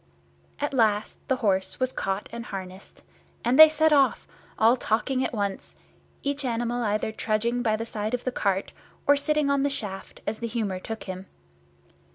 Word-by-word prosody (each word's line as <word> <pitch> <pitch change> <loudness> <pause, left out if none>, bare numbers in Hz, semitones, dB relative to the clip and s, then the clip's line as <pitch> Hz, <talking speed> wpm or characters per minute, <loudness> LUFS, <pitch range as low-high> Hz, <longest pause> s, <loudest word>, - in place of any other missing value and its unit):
At - - -2
last 215 -4 +1
the 260 - +2
horse 190 -2 +1
was 255 0 +1
caught 195 -3 -2
and 235 0 -6
harnessed, 190 0 -8 0.4
and 245 +4 +3
they 315 0 +12
set 315 0 +3
off, 275 -2 +3 0.3
all 225 +3 +5
talking 255 +3 0
at - - -1
once, 200 -3 -3 0.5
each 280 0 -1
animal 240 -1 -1
either 215 0 0
trudging 230 +3 -1
by 220 -3 +2
the 225 +1 -4
side 215 0 -2
of 245 - -7
the 255 - -1
cart 195 -5 -1 0.3
or 285 - +6
sitting 295 0 +1
on 280 -1 +2
the 285 - +2
shaft, 200 -8 -6
as 215 +1 -3
the 235 - -3
humour 215 -5 -2
took 225 +3 -6
him. 185 0 -7
230 Hz, 180 wpm, -26 LUFS, 205-260 Hz, 0.5 s, they